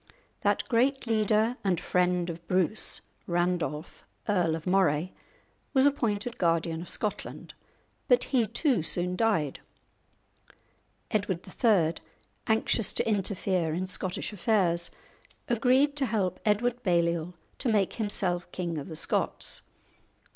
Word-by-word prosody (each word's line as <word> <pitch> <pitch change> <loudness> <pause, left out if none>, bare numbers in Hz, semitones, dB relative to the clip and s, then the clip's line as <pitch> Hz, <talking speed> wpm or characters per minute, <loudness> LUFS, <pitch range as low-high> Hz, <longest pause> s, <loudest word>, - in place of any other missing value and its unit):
That - - +1
great 265 +3 +2
leader 220 +1 +2
and 185 -4 +1
friend 180 -1 +1
of 170 0 -11
Bruce, 185 +3 +1 0.3
Randolph, 175 -3 -2 0.2
Earl 175 -6 +2
of 165 - -7
Moray, 180 -3 +2 0.6
was 265 0 +5
appointed 235 -5 0
Guardian 165 -1 +1
of 175 - -9
Scotland, 210 -3 -4 0.5
but - - +4
he 245 -5 +1
too 245 - +1
soon 180 +3 +1
died. 180 -10 +1 1.5
Edward 195 -4 -1
III., 185 -6 +2 0.5
anxious 220 -1 +2
to - - 0
interfere 190 -5 0
in 185 +2 -2
Scottish 185 +2 -2
affairs, 175 -4 +1 0.6
agreed 255 +5 +3
to 270 -3 +2
help 190 -5 -1
Edward 240 +4 +1
Balliol 170 -3 0 0.2
to 255 - 0
make 205 -4 +2
himself 190 -5 0
king 170 -3 -3
of 140 - -7
the 160 - -7
Scots. - - -1
190 Hz, 120 wpm, -28 LUFS, 170-225 Hz, 1.5 s, was